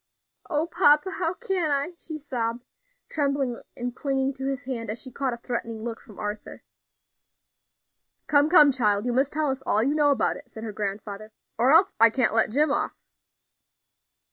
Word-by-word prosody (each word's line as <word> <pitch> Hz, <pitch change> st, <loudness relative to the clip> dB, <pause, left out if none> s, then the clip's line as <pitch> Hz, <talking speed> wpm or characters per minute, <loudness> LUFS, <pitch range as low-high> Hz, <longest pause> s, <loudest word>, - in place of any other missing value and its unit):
"O 310 Hz, -1 st, 0 dB
papa! 340 Hz, 0 st, +3 dB
how 360 Hz, -2 st, -2 dB
can 385 Hz, -8 st, -1 dB
I?" 285 Hz, +4 st, -1 dB
she 320 Hz, -2 st, -8 dB
sobbed, 245 Hz, -5 st, -4 dB, 0.4 s
trembling 275 Hz, -5 st, -1 dB, 0.2 s
and 245 Hz, 0 st, -4 dB
clinging 270 Hz, -1 st, -1 dB
to 265 Hz, 0 st, -5 dB
his 275 Hz, 0 st, -3 dB
hand 240 Hz, -5 st, -4 dB
as 220 Hz, +2 st, -3 dB
she 260 Hz, -, -6 dB
caught 270 Hz, +1 st, -2 dB
a -, -, -13 dB
threatening 230 Hz, -2 st, -5 dB
look 230 Hz, -1 st, -5 dB
from 210 Hz, -, -16 dB
Arthur. 210 Hz, 0 st, -6 dB, 1.6 s
"Come, 290 Hz, +1 st, +4 dB
come, 300 Hz, -4 st, +7 dB
child, 210 Hz, -4 st, +1 dB
you 245 Hz, -, 0 dB
must 265 Hz, +3 st, +1 dB
tell 300 Hz, -2 st, 0 dB
us 265 Hz, 0 st, -4 dB
all 220 Hz, -4 st, +2 dB
you 275 Hz, +4 st, +1 dB
know 295 Hz, -1 st, +3 dB
about 280 Hz, -, +1 dB
it," -, -, -15 dB
said 220 Hz, -, -10 dB
her 220 Hz, -2 st, -5 dB
grandfather, 205 Hz, +1 st, -5 dB, 0.2 s
"or 245 Hz, +4 st, +3 dB
else 355 Hz, +5 st, +5 dB
I 230 Hz, 0 st, +8 dB
can't 245 Hz, +1 st, +1 dB
let 225 Hz, -, +3 dB
Jim 290 Hz, +6 st, +2 dB
off." -, -, -1 dB
Mr. -, -, -39 dB
265 Hz, 185 wpm, -25 LUFS, 230-295 Hz, 1.6 s, I